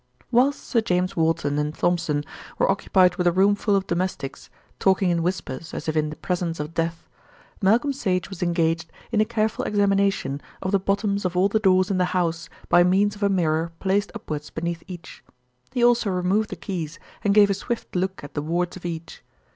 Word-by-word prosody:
Whilst 260 Hz, +4 st, +3 dB
Sir 230 Hz, -, +1 dB
James 180 Hz, -3 st, 0 dB
Walton 160 Hz, -3 st, +1 dB
and 150 Hz, +1 st, -2 dB
Thompson 165 Hz, -4 st, 0 dB, 0.3 s
were -, -, +3 dB
occupied 185 Hz, -2 st, +3 dB
with 180 Hz, -, +1 dB
a -, -, +5 dB
room 195 Hz, +3 st, +4 dB
full 205 Hz, 0 st, +1 dB
of 195 Hz, -1 st, +1 dB
domestics, 170 Hz, -6 st, -3 dB, 0.3 s
talking 190 Hz, -1 st, +3 dB
in 170 Hz, -1 st, +1 dB
whispers 165 Hz, -4 st, -3 dB
as -, -, -5 dB
if 155 Hz, -, -1 dB
in 155 Hz, -1 st, +1 dB
the 155 Hz, -, -7 dB
presence 175 Hz, -2 st, -2 dB
of 150 Hz, +2 st, -5 dB
death, 165 Hz, 0 st, -2 dB, 0.5 s
Malcolm 230 Hz, +8 st, +3 dB
Sage 185 Hz, -9 st, -1 dB
was 195 Hz, -3 st, -9 dB
engaged 170 Hz, -1 st, 0 dB, 0.2 s
in 215 Hz, -2 st, +3 dB
a -, -, +3 dB
careful 220 Hz, -1 st, -1 dB
examination 195 Hz, -8 st, +1 dB, 0.2 s
of 190 Hz, -, -1 dB
the 200 Hz, -, +3 dB
bottoms 200 Hz, +1 st, 0 dB
of 180 Hz, -1 st, -1 dB
all 190 Hz, +2 st, +4 dB
the 220 Hz, -, +2 dB
doors 185 Hz, -1 st, +3 dB
in 185 Hz, -, +1 dB
the 180 Hz, -, +3 dB
house 165 Hz, -2 st, -1 dB, 0.2 s
by 175 Hz, -, +6 dB
means 200 Hz, +3 st, +2 dB
of 205 Hz, -, -14 dB
a 200 Hz, -, +3 dB
mirror 165 Hz, -3 st, +1 dB
placed 200 Hz, +1 st, 0 dB
upwards 150 Hz, -9 st, -5 dB
beneath 170 Hz, +1 st, -4 dB
each. 175 Hz, -2 st, -10 dB, 0.5 s
He 245 Hz, -, 0 dB
also 240 Hz, -3 st, +4 dB
removed 190 Hz, +4 st, +1 dB
the -, -, -5 dB
keys 170 Hz, -6 st, -5 dB, 0.3 s
and 205 Hz, -1 st, +2 dB
gave 205 Hz, -1 st, +6 dB
a -, -, +3 dB
swift 235 Hz, +2 st, -5 dB
look 190 Hz, -1 st, -1 dB
at 145 Hz, -, -9 dB
the 145 Hz, -, -2 dB
wards 175 Hz, +3 st, -1 dB
of 185 Hz, -, -10 dB
each. 165 Hz, -1 st, -7 dB
180 Hz, 205 wpm, -24 LUFS, 165-200 Hz, 0.5 s, by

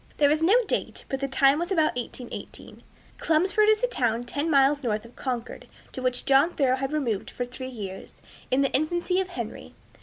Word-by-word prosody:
There 290 Hz, -1 st, +4 dB
is 305 Hz, +1 st, +1 dB
no 365 Hz, +7 st, +5 dB
date, -, -, -3 dB
but 270 Hz, -, -2 dB
the 275 Hz, -, -1 dB
time 275 Hz, +2 st, +3 dB
was 345 Hz, +3 st, -3 dB
about 315 Hz, -7 st, +2 dB
1818. 245 Hz, 0 st, -7 dB, 0.4 s
Chelmsford 375 Hz, +7 st, +3 dB
is 435 Hz, +2 st, +3 dB
a -, -, +4 dB
town 240 Hz, -, 0 dB
ten 285 Hz, +6 st, -3 dB
miles 280 Hz, 0 st, +4 dB
north 215 Hz, -4 st, -2 dB
of 235 Hz, -, -15 dB
Concord, 250 Hz, -3 st, -5 dB, 0.2 s
to 260 Hz, -, -7 dB
which 250 Hz, -1 st, -1 dB
John 275 Hz, +5 st, +4 dB
Thoreau 260 Hz, -3 st, +2 dB
had 270 Hz, +1 st, -3 dB
removed 245 Hz, -10 st, -1 dB
for 245 Hz, -, -4 dB
three 255 Hz, +1 st, -7 dB
years, 200 Hz, -6 st, -8 dB, 0.3 s
in 265 Hz, +2 st, +2 dB
the 275 Hz, -, 0 dB
infancy 345 Hz, +5 st, +1 dB
of 375 Hz, -, -4 dB
Henry. 355 Hz, -, -7 dB
275 Hz, 200 wpm, -26 LUFS, 250-320 Hz, 0.4 s, no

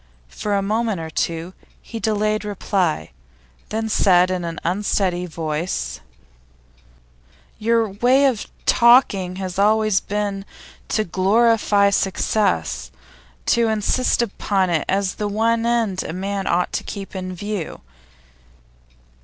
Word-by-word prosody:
For 205 Hz, -, -2 dB
a 200 Hz, -, +1 dB
moment 215 Hz, -1 st, 0 dB
or 160 Hz, -1 st, -6 dB
two 165 Hz, +3 st, -2 dB, 0.3 s
he 230 Hz, -, -8 dB
delayed 215 Hz, -1 st, 0 dB
reply, 195 Hz, -, -1 dB, 0.6 s
then 220 Hz, +1 st, -2 dB
said 185 Hz, -4 st, +4 dB
in 180 Hz, -1 st, -2 dB
an 170 Hz, 0 st, -4 dB
unsteady 180 Hz, -1 st, 0 dB
voice: 155 Hz, -, -3 dB, 1.6 s
'Your 230 Hz, +1 st, +2 dB
way 245 Hz, +8 st, +3 dB
of 255 Hz, -6 st, 0 dB, 0.2 s
talking 220 Hz, -7 st, +4 dB
has 185 Hz, -1 st, -4 dB
always 215 Hz, 0 st, +3 dB
been 205 Hz, -1 st, -3 dB, 0.4 s
to 215 Hz, -, 0 dB
glorify 205 Hz, +2 st, +3 dB
success, 200 Hz, +2 st, 0 dB, 0.6 s
to 235 Hz, -1 st, +3 dB
insist 220 Hz, +3 st, +1 dB
upon 195 Hz, -4 st, -1 dB
it 160 Hz, -3 st, 0 dB
as 195 Hz, -1 st, +1 dB
the 210 Hz, -, -3 dB
one 225 Hz, +2 st, +1 dB
end 225 Hz, -6 st, +1 dB
a -, -, -5 dB
man 195 Hz, +2 st, -3 dB
ought 175 Hz, +1 st, 0 dB
to -, -, -2 dB
keep 195 Hz, -1 st, -7 dB
in 185 Hz, -1 st, -5 dB
view. 205 Hz, -3 st, -5 dB
200 Hz, 120 wpm, -21 LUFS, 185-220 Hz, 1.6 s, said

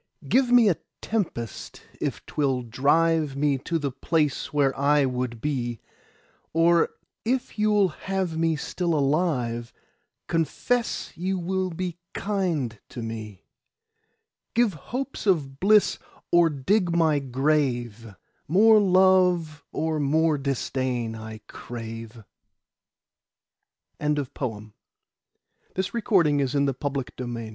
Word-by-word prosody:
Give 255 Hz, -1 st, +3 dB
me 245 Hz, -3 st, +7 dB
a 180 Hz, -, +3 dB, 0.2 s
tempest 165 Hz, -, -4 dB, 0.2 s
if -, -, -3 dB
'twill 135 Hz, -4 st, 0 dB
drive 145 Hz, +5 st, +2 dB
Me 140 Hz, -1 st, +1 dB
to 165 Hz, +5 st, -2 dB
the 145 Hz, -3 st, -2 dB
place 150 Hz, +1 st, 0 dB
where 140 Hz, -2 st, +2 dB
I 145 Hz, +1 st, +3 dB
would 125 Hz, -2 st, -3 dB
be; 120 Hz, -5 st, -2 dB, 0.7 s
Or 165 Hz, +1 st, +4 dB, 0.3 s
if 245 Hz, -1 st, -2 dB
you'll 210 Hz, -2 st, +3 dB
have 185 Hz, +1 st, -3 dB
me 165 Hz, 0 st, +1 dB
still 170 Hz, +2 st, -2 dB
alive, 135 Hz, -6 st, 0 dB, 0.5 s
Confess 200 Hz, -, -1 dB
you 190 Hz, +3 st, -1 dB
will 185 Hz, +1 st, -1 dB
be 175 Hz, 0 st, -4 dB, 0.2 s
kind 170 Hz, -, -1 dB
to 120 Hz, -, -6 dB
me. 110 Hz, -3 st, -7 dB, 1.1 s
10 240 Hz, +1 st, +5 dB
Give 205 Hz, -, -3 dB
hopes 250 Hz, -, -5 dB
of 140 Hz, -8 st, +1 dB
bliss 210 Hz, +2 st, +4 dB, 0.3 s
or 175 Hz, -1 st, +5 dB
dig 175 Hz, +7 st, +1 dB
my 160 Hz, -3 st, +3 dB
grave: 125 Hz, -5 st, -1 dB, 0.3 s
More 215 Hz, +7 st, +6 dB
love 185 Hz, -5 st, +3 dB
or 160 Hz, -1 st, -1 dB
more 155 Hz, +1 st, +2 dB
disdain 130 Hz, -3 st, -2 dB
I 110 Hz, -1 st, -8 dB
crave. 115 Hz, -1 st, -8 dB, 1.8 s
Contents 150 Hz, -3 st, -1 dB
BIBLIOGRAPHIC 120 Hz, -, -8 dB
RECORD 220 Hz, -6 st, +3 dB
Previous 145 Hz, -2 st, +1 dB
Article 135 Hz, -3 st, -2 dB
N 115 Hz, -1 st, -6 dB
150 Hz, 110 wpm, -25 LUFS, 130-180 Hz, 1.8 s, me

